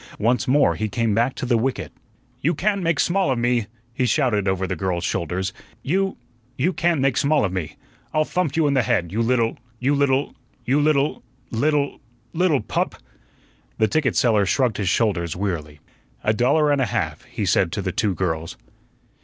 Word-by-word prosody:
Once 120 +4 +1
more 140 +3 +4
he 110 -1 -3
came 115 +1 0
back 120 +5 +1
to - - -4
the 120 -2 +2
wicket. 130 +3 -2 0.5
"You 165 +5 +1
can't 200 0 0
make 165 -3 0
small 190 0 +2
of 130 - +1
me," 120 -2 +1 0.3
he 125 +1 0
shouted 115 -9 +1
over 95 0 0
the 95 - -2
girls' 90 0 -2
shoulders; 90 +2 -2 0.3
"you 190 +6 0 0.4
you 170 +8 +1
can't 170 -1 +1
make 135 -2 +2
small 150 -4 +3
of 95 - -3
me. 90 -5 -4 0.4
I'll 155 -1 +2
thump 170 -5 -1
you 160 -1 +3
in 145 - +2
the 130 - +3
head, 85 -7 0
you 110 +4 -1
little 115 -1 +1 0.2
you 130 +5 +1
little 140 -1 +1 0.3
you 135 +4 +2
little 145 -1 +1 0.3
little 140 +4 0 0.3
little 165 -6 +2
pup." - - -2 0.8
The 110 - +3
ticket 140 +5 0
seller 110 -6 +3
shrugged 125 0 +1
his 100 -4 0
shoulders 85 -6 0
wearily. 80 -6 -4 0.4
"A 110 - +2
dollar 145 +6 +3
and 140 -2 +2
a 125 - +1
half," 80 -7 -2
he - - -4
said 85 - +2
to 100 - -2
the 90 - -1
two 100 0 0
girls. 80 -3 -2
120 Hz, 185 wpm, -22 LUFS, 100-145 Hz, 0.8 s, more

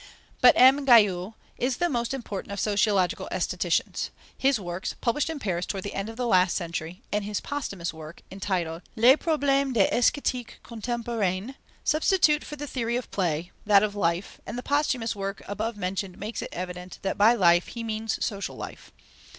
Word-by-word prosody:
But 250 - +8
M. 265 +3 +7
Guyau 210 -5 +4 0.2
is 250 0 0
the 350 - +2
most 235 -7 -1
important 220 -7 -5
of 200 - -4
sociological 200 -3 +1
aestheticians. - - -1 0.3
His 270 -3 +2
works, 175 -1 -4
published 265 +6 0
in 320 - -3
Paris 180 -8 -2
toward 195 -2 -3
the 205 - -5
end 195 +2 -3
of 225 - -9
last 185 -8 +3
century, 170 +3 -5
and 210 0 0
his 205 0 -2
posthumous 200 - -4
work, 160 +1 -11
entitled 180 -4 -2
Les 245 +4 +7
problèmes 280 -4 +1
de 215 - +4
l'Esthétique 245 -1 +1
contemporaine, 230 -2 -2 0.3
substitute 310 -1 +3
for 300 - -7
the 290 0 -6
theory 235 -4 -2
of 250 - -4
play, 175 -2 -1 0.2
that 200 -1 +6
of 210 -1 0
life, 175 -2 -1
and 240 - -5
the 245 - -5
posthumous 270 -6 0
work 195 0 -5
above 210 +2 -3
mentioned 185 -1 -3
makes 215 +3 -5
it - - -5
evident 180 0 -6
that 195 - -1
by 220 +4 +5
life 175 -4 +4
he 235 - -6
means 220 0 -2
social 200 -2 -4
life. - - -9
210 Hz, 175 wpm, -26 LUFS, 185-245 Hz, 0.3 s, But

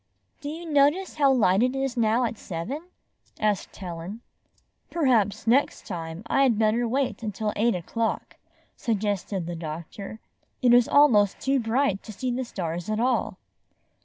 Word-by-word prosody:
"Do 290 - -5
you 330 +3 -7
notice 295 +6 +2
how 280 -2 +5
light 205 -6 +3
it 255 +2 +2
is 270 -2 -1
now 230 +1 +2
at 235 -1 -1
seven?" 220 - -6 0.5
asked 210 -2 -1
Helen. 180 +4 -7 0.7
"Perhaps 245 - +1
next 250 +5 +2
time 165 +2 -6
I 270 - +2
had 250 -5 +4
better 225 +2 +2
wait 265 +3 0
imtil 215 -1 -3
eight 230 +1 +2
o'clock," 225 +6 -3 0.4
suggested 205 -4 -2
the 175 0 -4
doctor. 170 +6 -7 0.4
"It 245 -1 +6
is 245 -1 +6
almost 220 -9 +4
too 270 0 +1
bright 230 -2 +1
to 220 - -9
see 255 +5 -3
the 250 +2 -2
stai's 175 -6 -4
at 215 0 0
all. 250 +2 0
225 Hz, 155 wpm, -26 LUFS, 195-260 Hz, 0.7 s, It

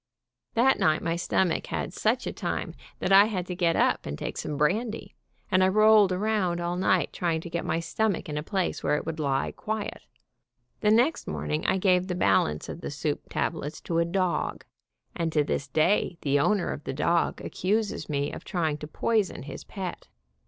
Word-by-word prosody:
That 255 +4 +4
night 155 0 +2
my 165 0 0
stomach 175 0 0
had - - -3
such - - 0
a - - -3
time - - -3 0.2
that 185 - -2
I 195 +1 +8
had 190 -5 -2
to 180 - -5
get 170 -2 +2
up - - +2
and 70 0 -4
take - - -4
some 150 - -4
brandy, 215 +10 0 0.4
and 185 -1 +4
I - - +5
rolled 215 0 +5
around 185 -2 0
all 175 0 -2
night, 185 -1 +1
trying 165 -2 0
to 170 - -9
get 170 - -2
my 160 +1 0
stomach 205 +3 -1
in 150 - -4
a 150 - -1
place 190 +3 -2
where - - +1
it - - -3
would 160 0 -4
lie 135 -3 0
quiet. 215 -1 -4 0.8
The 210 - +2
next 245 +9 +3
morning 75 0 -2
I 190 - +3
gave 185 -1 +3
the 180 - -2
balance 95 - +2
of - - -7
the - - -4
soup - - -3
tablets 150 +2 -2
to 165 -1 -1
a - - +4
dog, 180 +1 -1 0.5
and 165 -2 -1
to 150 - +3
this 140 - -2
day 175 +2 +2
the 145 0 +2
owner 200 +6 +1
of 145 - -7
the - - -3
dog 170 +4 +1
accuses 210 +1 -2
me 145 -1 -1
of - - -7
try 170 -5 -1
ing 150 - -3
to 150 - -7
poison 210 - 0
his 140 - -8
pet. 190 -3 -6
175 Hz, 200 wpm, -27 LUFS, 155-200 Hz, 0.8 s, I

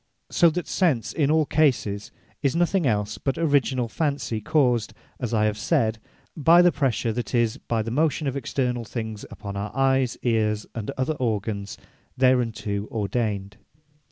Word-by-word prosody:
So 170 - +5
that 175 +2 -4
Sense 155 - +1
in 145 -3 +1
all 155 0 +3
cases, 125 -10 +1 0.3
is 140 0 +1
nothing 175 -1 +2
els 105 -2 -1
but 135 -2 -1
originall 140 -6 +1
fancy, 140 -5 -2
caused 120 -4 +1 0.2
(as 120 -4 -3
I 110 -2 +2
have 105 0 -1
said) 110 0 +1 0.4
by 165 +3 +6
the 175 - +5
pressure, 130 -6 0
that 120 +2 -3
is, 115 -2 +2
by 115 -2 -2
the 115 - -4
motion, 155 +3 +1
of 135 - -1
externall 125 -3 -2
things 110 -2 -5
upon 100 -1 -7
our 100 +1 -3
Eyes, 135 -2 +2
Eares, 110 -3 +1
and 110 -3 -5
other 130 +4 0
organs 105 -4 -2 0.4
thereunto 115 -5 +1
ordained. 100 -2 -2
120 Hz, 155 wpm, -24 LUFS, 110-140 Hz, 0.4 s, by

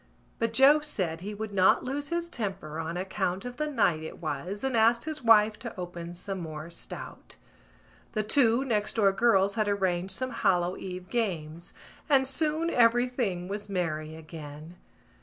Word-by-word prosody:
But 230 -1 +1
Joe 270 +6 +6
said 185 - -3
he 205 +3 -5
would 215 0 -5
not 190 -1 +4
lose 285 +3 -3
his 340 +2 -2
temper 195 - -5
on 165 +2 -3
account 190 +2 -2
of 245 0 -6
the 300 0 -1
night 215 - +2
it 160 - -7
was 170 - -4
and 265 -2 0
asked 230 +1 +4
his 310 -1 -4
wife 215 -2 +5
to 230 -5 -7
open 175 -1 -6
some 190 +2 -5
more 160 -1 -7
stout. 170 - -9 0.8
The 215 - 0
two 240 +2 +3
next 215 -5 0
door 205 -4 +4
girls 200 -2 +3
had 215 -2 0
arranged 190 -2 0
some 255 0 -3
Hallow 180 -4 +1
Eve 185 -1 -7
games 170 -8 -3 0.3
and 270 -2 +5
soon 310 +4 0
everything 235 -6 +2
was 205 +1 -5
merry 160 -4 -2
again. 155 0 -10
200 Hz, 165 wpm, -28 LUFS, 175-240 Hz, 0.8 s, Joe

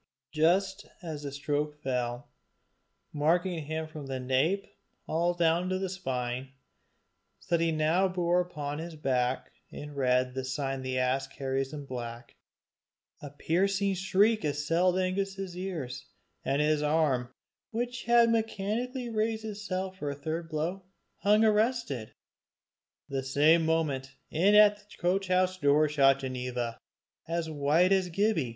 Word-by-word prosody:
Just 190 +5 +1 0.2
as 155 -4 -5
the 140 -1 -5
stroke 150 +1 -2
fell, 125 0 -2 0.8
marking 165 +2 +1
him 160 +1 -2
from 155 -3 -8
the 135 -1 -3
nape 135 +10 +1 0.4
all 170 +2 0
down 170 +1 +2
the 185 0 -1
spine, 130 -7 -3 0.9
so 170 - -1
that 165 - +1
he 165 - +2
now 160 +5 +2
bore 180 -1 +1
upon 150 -4 -5
his 165 0 -6
back 130 -3 -1 0.2
in 145 0 -8
red 125 -2 +1
the 130 0 -3
sign 135 0 -3
the 130 0 -2
ass 130 +1 +1
carries 135 0 -3
in 145 -2 -7
black, 120 -2 -7 0.9
a 145 - -7
piercing 195 +7 +1
shriek 200 +4 +2
assailed 165 +5 +1
Angus's 190 0 -2
ears, 175 -9 -5 0.4
and 140 +2 +1
his 150 0 +2
arm, 150 -5 +1 0.4
which 240 +1 -3
had 235 -1 +5
mechanically 230 +3 -1
raised 220 0 -1
itself 190 -3 -4
for 145 - -2
a 140 - -3
third 160 +3 -4
blow, 165 +5 -2 0.4
hung 210 +2 +4
arrested. 215 - 0 0.9
The 135 -1 -2
same 150 +5 +4
moment, 140 -5 -1 0.2
in 190 +6 +4
at 210 -1 +7
the 205 0 -18
coach 185 +2 0
house 185 0 +2
door 150 0 +4
shot 135 -2 +4
Ginevra, 125 -3 -3 0.5
as 165 -1 -2
white 155 +5 +3
as 190 -2 +3
Gibbie. 175 - +1
160 Hz, 140 wpm, -29 LUFS, 135-190 Hz, 0.9 s, at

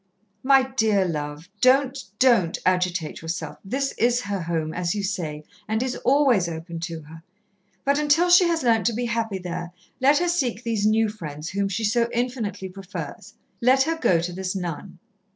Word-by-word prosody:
"My 270 0 +5
dear 220 -7 +1
love, 150 0 -4
don't 265 +1 +3
don't 225 -10 +3
agitate 180 -3 0
yourself. 160 -2 -5
This 270 +7 -1
is 240 +1 +3
her 200 -4 -3
home, 165 -2 -2
as 175 +1 -1
you 205 - -2
say, 160 -7 -3 0.2
and 220 +2 0
is 260 0 -2
always 255 -10 +3
open 165 +1 -6
to 165 -1 -5
her. 160 +2 -13 0.6
But 280 +1 +2
until 310 +4 +3
she 355 0 +7
has 330 -3 0
learnt 230 -3 +3
to 235 - +1
be 240 +2 -2
happy 230 -3 -1
there, 175 -1 -6 0.3
let 280 +3 +5
her 350 +3 +1
seek 260 -10 -1
these 220 -3 0
new 220 +1 +3
friends, 155 -7 -7
whom 200 0 -1
she 200 +4 -2
so 235 +2 +2
infinitely 235 -5 -2
prefers. 190 0 -8 0.3
Let 260 +3 +5
her 330 +3 -1
go 235 - +2
to 175 +1 -3
this 185 +1 -3
nun." 180 0 -5
210 Hz, 180 wpm, -24 LUFS, 175-255 Hz, 0.6 s, she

